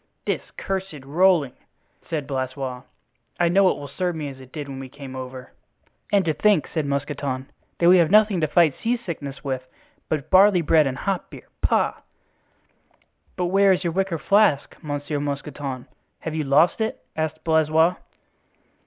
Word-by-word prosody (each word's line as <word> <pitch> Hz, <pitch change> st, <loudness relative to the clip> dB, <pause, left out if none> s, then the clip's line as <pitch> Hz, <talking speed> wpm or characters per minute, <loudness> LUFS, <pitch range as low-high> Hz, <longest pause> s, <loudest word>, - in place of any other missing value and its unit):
"This -, -, -1 dB, 0.2 s
cursed 190 Hz, -8 st, -4 dB
rolling!" 160 Hz, -2 st, +3 dB, 0.6 s
said 155 Hz, -4 st, -2 dB
Blaisois. 130 Hz, -1 st, -4 dB, 0.6 s
"I 175 Hz, -1 st, +3 dB
know 190 Hz, +2 st, +5 dB
it -, -, -1 dB
will 145 Hz, -, -7 dB
serve 175 Hz, +5 st, -2 dB
me 150 Hz, -3 st, -4 dB
as 135 Hz, -1 st, -11 dB
it 130 Hz, -1 st, -15 dB
did 145 Hz, -2 st, -6 dB
when 135 Hz, -1 st, -7 dB
we 135 Hz, -1 st, -8 dB
came 135 Hz, -1 st, -10 dB
over." 130 Hz, 0 st, -8 dB, 0.6 s
"And 200 Hz, -3 st, +3 dB
to 160 Hz, -, +1 dB
think," 195 Hz, +1 st, +2 dB
said 155 Hz, -3 st, -2 dB
Mousqueton, 140 Hz, -2 st, -3 dB, 0.3 s
"that 170 Hz, -, +3 dB
we 180 Hz, +1 st, +7 dB
have 165 Hz, -2 st, +3 dB
nothing 210 Hz, -2 st, +4 dB
to 155 Hz, -, +2 dB
fight 155 Hz, -1 st, +4 dB
seasickness 170 Hz, -, -4 dB
with 130 Hz, -2 st, -2 dB, 0.5 s
but 155 Hz, -1 st, -2 dB
barley 190 Hz, -2 st, +6 dB
bread 155 Hz, -1 st, +4 dB
and 130 Hz, -1 st, -3 dB
hop 195 Hz, -2 st, -2 dB
beer. -, -, -12 dB
Pah!" -, -, +1 dB, 1.4 s
"But 180 Hz, -, -1 dB
where 195 Hz, +2 st, +4 dB
is 185 Hz, 0 st, +1 dB
your 170 Hz, -2 st, -1 dB
wicker 190 Hz, -2 st, 0 dB
flask, 200 Hz, -5 st, +2 dB
Monsieur 145 Hz, 0 st, -3 dB
Mousqueton? 140 Hz, -2 st, -4 dB, 0.4 s
Have 160 Hz, -, -4 dB
you 155 Hz, -2 st, -2 dB
lost 150 Hz, +10 st, +3 dB
it?" 220 Hz, -, -3 dB
asked 155 Hz, 0 st, -3 dB
Blaisois. 160 Hz, +1 st, +3 dB
155 Hz, 165 wpm, -23 LUFS, 140-180 Hz, 1.4 s, we